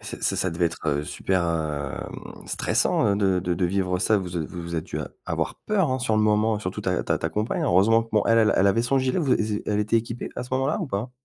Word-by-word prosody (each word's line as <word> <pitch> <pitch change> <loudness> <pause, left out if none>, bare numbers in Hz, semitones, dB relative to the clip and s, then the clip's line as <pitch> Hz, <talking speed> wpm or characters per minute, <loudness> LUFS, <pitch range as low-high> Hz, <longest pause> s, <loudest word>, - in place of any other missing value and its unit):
Ç - - -7
ça - - +1
ça 95 - 0
devait 85 +1 +1
être, 80 - -6
heu, 75 +1 0
super 95 +3 -1
hem 75 -5 -4
stressant, - - +1
heu, 100 - +2
de 95 -2 +2
de 90 0 -1
de 90 - 0
vivre 90 0 0
ça. 110 +4 +3
Vous 90 -3 -4
a - - 0
vous 85 +2 -6
vous 85 0 -4
êtes 80 - -2
dû - - -5
a - - -4 0.2
avoir - - -2
peur, 195 -8 +2
hein, 130 - 0
sur 120 -3 0
le 110 - +3
moment. 105 +1 +2
Surtout 90 -3 -4
ta - - 0
ta - - 0
ta - - -1
compagne 105 +2 -2
hein, - - +1
heureusement 105 +6 +4
que 115 - -13
bon, 105 - +3
elle 115 -2 +4
elle 95 - +4
avait 115 +4 +3
son 135 +3 +2
gilet. 130 +5 0
Vous 145 -7 +3
é 105 -1 -1
elle 105 -1 0
était 105 +2 +2
équipée 115 +1 -3
à - - -2
ce 125 - -9
moment-là, 135 +3 0
ou 175 - -2
pas? 115 +1 -3
105 Hz, 275 wpm, -25 LUFS, 90-115 Hz, 0.2 s, heureusement